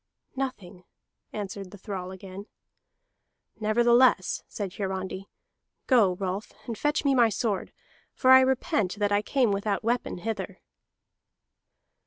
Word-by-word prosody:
"Nothing," 205 -9 -5 0.5
answered 200 -2 -6
the 205 - -12
thrall 190 -2 -6
again. 190 +2 -9 1.1
"Nevertheless," 235 -1 +3
said 195 -4 -5
Hiarandi, 190 -1 -4 0.6
"go, 215 -9 +4
Rolf, 190 +2 -4
and 230 - -4
fetch 295 +5 0
me 275 - +4
my 240 -3 +5
sword; 210 -2 -2 0.4
for 260 - +4
I 260 0 +10
repent 235 -7 +1
that 205 -1 0
I 205 0 +3
came 245 +1 +1
without 200 +1 -1
weapon 240 -2 -1
hither." 195 -1 -5
205 Hz, 120 wpm, -27 LUFS, 190-240 Hz, 1.1 s, I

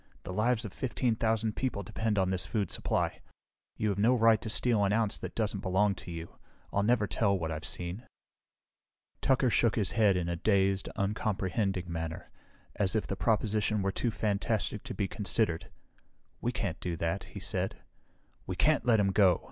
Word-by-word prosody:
"The 90 - -6
lives 115 +3 +1
of 105 - -7
fifteen 125 -2 0
thousand 110 -1 0
people 125 -6 -2
depend 110 +3 -2
on 95 -1 +2
this 95 -1 -1
food 100 -6 -1
supply. - - 0 0.6
You 105 - 0
have 100 -1 -1
no 120 +5 +4
right 115 -2 +4
to 110 - -4
steal 110 0 +3
an 100 - +2
ounce 110 -1 +1
that - - -7
doesn't 105 -3 -1
belong 95 +2 +2
to 90 - -10
you. 85 0 -8 0.3
I'll 100 - +2
never 110 0 +3
tell 100 -1 +1
what 80 -2 -3
I've 80 0 -4
seen." 90 +9 -3 1.1
Tucker 130 -2 +3
shook 115 -1 +3
his 100 -5 0
head 105 -5 +3
in 90 -2 -1
a 85 - -1
dazed, 95 +1 +1
uncomprehending 100 -2 -1
manner, 80 -2 -5 0.4
as 100 0 0
if 110 - +1
the 100 - -3
proposition 105 -1 +1
were 95 - +1
too 120 - -1
fantastic 105 -1 -1
to - - -6
be 100 - 0
considered. 95 -4 -1 0.7
"We 120 - 0
can't 100 -7 -3
do 85 -2 -3
that," 85 +4 -2
he - - -4
said. - - -1 0.7
"We 95 - -3
can't 155 +8 +3
let 115 -3 +5
him 100 -1 +2
go!" 95 -3 +4
100 Hz, 185 wpm, -30 LUFS, 95-110 Hz, 1.1 s, let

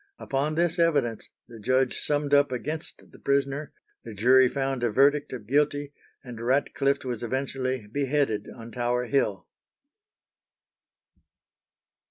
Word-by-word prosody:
Upon 140 +3 -1
this 170 0 +1
evidence 145 -9 +1 0.2
the 115 -2 -12
judge 130 +4 +1
summed 145 -1 -1
up 145 -1 +5
against 150 +6 -5
the - - -16
prisoner, 140 +1 0 0.3
the 115 -2 -9
jury 130 +4 +5
found 135 -2 -2
a 120 - +2
verdict 140 +6 +3
of 120 -5 -7
guilty, 145 +3 +1 0.3
and 120 -4 -9
Ratcliffe 140 +2 +1
was 120 -3 -3
eventually 130 -1 -2
beheaded 135 -1 -1
on 115 0 -10
Tower 125 0 -1
Hill. 105 -8 0
135 Hz, 125 wpm, -26 LUFS, 120-145 Hz, 0.3 s, up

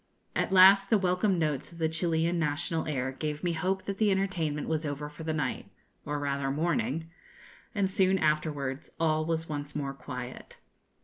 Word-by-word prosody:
At - - 0
last 195 +1 +7
the 220 - +5
welcome 185 +1 +1
notes 150 -3 -1
of 170 - -13
the 160 -1 +1
Chilian 165 +1 0
national 160 +1 0
air 130 -3 -1
gave 150 +3 -4
me 175 -1 +1
hope 185 +4 -1
that 195 -1 -5
the 215 -2 +4
entertainment 180 -6 0
was 160 0 0
over 150 0 -4
for 150 +2 -10
the 160 - -1
night 150 -5 -2 0.4
or 150 0 -1
rather 140 -1 -1
morning 155 0 0 0.7
and 200 -2 +2
soon 190 0 +3
afterwards 150 -4 -1
all 155 -1 +2
was 165 0 -1
once 145 -1 -4
more 140 -2 -2
quiet. 125 -2 -8
160 Hz, 175 wpm, -29 LUFS, 145-180 Hz, 0.7 s, last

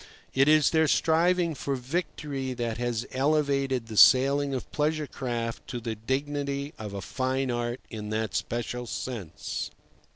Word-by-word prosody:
It 135 +1 +4
is 155 -1 +5
their 160 -1 +4
striving 170 +3 +3
for 140 -1 -2
victory 135 -1 -3
that 120 -1 -2
has 120 -1 -1
elevated 140 -2 +1
the 110 -2 -7
sailing 140 +4 +6
of 130 -2 -4
pleasure 155 0 0
craft 120 -4 -4
to 120 - -4
the 115 -1 -3
dignity 140 +5 -2
of 105 -2 -6
a 100 - -4
fine 130 +3 -1
art 120 +1 -2
in 105 -2 -5
that 110 -1 -1
special 120 +1 -2
sense. 110 -12 -4
130 Hz, 150 wpm, -28 LUFS, 120-145 Hz, -, sailing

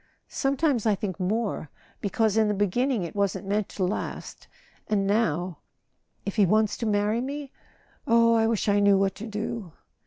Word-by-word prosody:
"Sometimes 270 -4 +1
I 210 - +4
think 195 -1 -4
more—because 205 +1 -2
in 220 -1 +4
the 210 - 0
beginning 215 +3 +1
it 170 - -6
wasn't 200 0 -1
meant 205 +1 -1
to 190 - -3
last. 185 +3 -4 0.4
And 200 -2 +1
now—if 190 0 -3
he 210 - +6
wants 215 +2 +2
to 230 - -2
marry 210 +2 +1
me? 280 +1 -5 0.6
Oh, 230 0 +5
I 225 -1 +3
wish 225 -2 0
I 205 0 +3
knew 200 -1 +5
what 195 -1 +1
to 220 +4 -8
do! 210 -4 -5
210 Hz, 160 wpm, -26 LUFS, 195-230 Hz, 0.6 s, he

